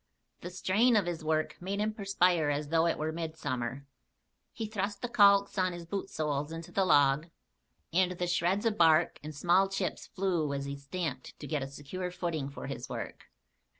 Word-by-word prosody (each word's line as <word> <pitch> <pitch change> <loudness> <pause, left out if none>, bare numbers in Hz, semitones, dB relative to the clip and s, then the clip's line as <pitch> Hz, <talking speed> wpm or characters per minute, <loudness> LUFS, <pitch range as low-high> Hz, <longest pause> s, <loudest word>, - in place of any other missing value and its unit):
The 175 - -6
strain 210 +7 +2
of 205 -4 +3
his 170 -2 -4
work 155 +1 -1
made 195 +3 -3
him 215 +1 0
perspire 180 -6 +2
as 145 0 -1
though 165 +1 +3
it 170 - 0
were 155 +1 -2
midsummer. 145 -5 -4 0.7
He 225 - -4
thrust 205 -1 -3
the - - 0
calks 200 -3 +5
on 185 -1 +1
his 175 -1 -7
bootsoles 155 -6 -2
into 165 0 -7
the 195 - +2
log 145 -1 +4 0.7
and 180 +1 +3
the 180 0 -2
shreds 180 +4 +1
of 220 -4 0
bark 165 0 +4
and 155 0 -8
small 180 +5 +3
chips 195 -2 -3
flew 175 -7 -1
as 140 0 -3
he 140 0 -4
stamped 140 -1 -5
to - - -7
get 150 -1 -2
a 135 - -3
secure 145 +7 -5
footing 170 -6 -3
for 140 - -8
his - - -6
work. - - -6
170 Hz, 185 wpm, -31 LUFS, 150-195 Hz, 0.7 s, calks